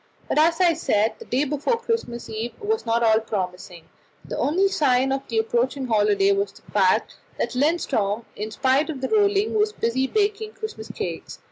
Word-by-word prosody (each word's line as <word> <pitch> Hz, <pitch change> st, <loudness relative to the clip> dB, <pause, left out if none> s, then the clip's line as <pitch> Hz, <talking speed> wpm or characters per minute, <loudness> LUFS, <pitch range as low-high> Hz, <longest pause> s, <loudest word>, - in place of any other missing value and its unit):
But, -, -, +1 dB
as 330 Hz, +2 st, +3 dB
I 350 Hz, -2 st, +5 dB
said, 220 Hz, -8 st, +1 dB
the -, -, -10 dB
day 255 Hz, +4 st, 0 dB
before 295 Hz, -, 0 dB
Christmas 460 Hz, -, -3 dB
Eve 225 Hz, +2 st, -5 dB
was 430 Hz, -, -2 dB
not 230 Hz, +1 st, +2 dB
at -, -, +4 dB
all 220 Hz, -, +4 dB
promising. 185 Hz, -5 st, -5 dB, 0.4 s
The -, -, -5 dB
only 370 Hz, +7 st, +2 dB
sign 265 Hz, -7 st, +2 dB
of 270 Hz, 0 st, 0 dB
the 230 Hz, -, -3 dB
approaching 245 Hz, +4 st, 0 dB
holiday 205 Hz, -4 st, +3 dB
was 200 Hz, 0 st, 0 dB
the -, -, -19 dB
fact 190 Hz, -3 st, +2 dB, 0.2 s
that -, -, -1 dB
Lindström, 250 Hz, -7 st, 0 dB
in 210 Hz, +1 st, -4 dB
spite 265 Hz, +7 st, +1 dB
of 280 Hz, -5 st, -5 dB
the 260 Hz, -, -2 dB
rolling, 410 Hz, -1 st, +2 dB
was 425 Hz, 0 st, +1 dB
busy 260 Hz, -, 0 dB
baking 425 Hz, +4 st, -1 dB
Christmas 225 Hz, -, -7 dB
cakes. 175 Hz, -5 st, -5 dB
260 Hz, 190 wpm, -23 LUFS, 220-345 Hz, 0.4 s, I